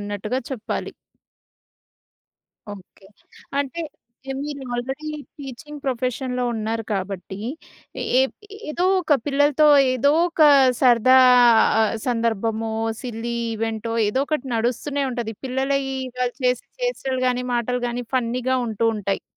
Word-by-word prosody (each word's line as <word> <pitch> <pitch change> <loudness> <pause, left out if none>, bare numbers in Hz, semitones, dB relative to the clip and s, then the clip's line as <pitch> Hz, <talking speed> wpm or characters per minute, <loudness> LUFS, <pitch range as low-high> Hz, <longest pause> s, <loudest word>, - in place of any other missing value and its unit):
అన్నట్టుగా 205 +4 -3
చెప్పాలి. 250 -5 -4 1.8
ఓకే. 195 0 -17 0.5
అంటే 285 +4 -2 0.5
యాహ్! 270 - -3
మీరు 290 -2 -6
ఆల్రెడీ 265 +5 -4 0.3
టీచింగ్ 290 +2 -9
ప్రొఫెషన్‌లో 250 0 -2
ఉన్నారు 225 +1 -3
కాబట్టి, 190 0 -4 0.8
ఏప్ 265 - +1 0.4
ఏదో 345 +4 -1 0.2
ఒక 310 -5 +3
పిల్లలతో 290 +1 +3 0.3
ఏదోక 315 +7 +2 0.4
సరదా 255 0 +6 0.9
సందర్భమో, 225 -2 -1 0.3
సిల్లీ 235 -1 -4 0.2
ఈవెంటో 225 0 -3 0.2
ఏదోకటి 275 +4 -1
నడుస్తూనే 250 +5 -1
ఉంటది. 235 -2 -4
పిల్లలయి 270 +1 -1 0.2
గలి 250 -1 -1
చేసే 250 -1 +1
చేష్టలు 270 - -2
గానీ, 250 0 -1
మాటలు 245 +1 -1
గానీ 245 +1 -4
ఫన్నీ‌గా 255 +1 0
ఉంటూ 225 +1 -1
ఉంటాయి. 200 -1 -2
250 Hz, 100 wpm, -22 LUFS, 225-275 Hz, 1.8 s, సరదా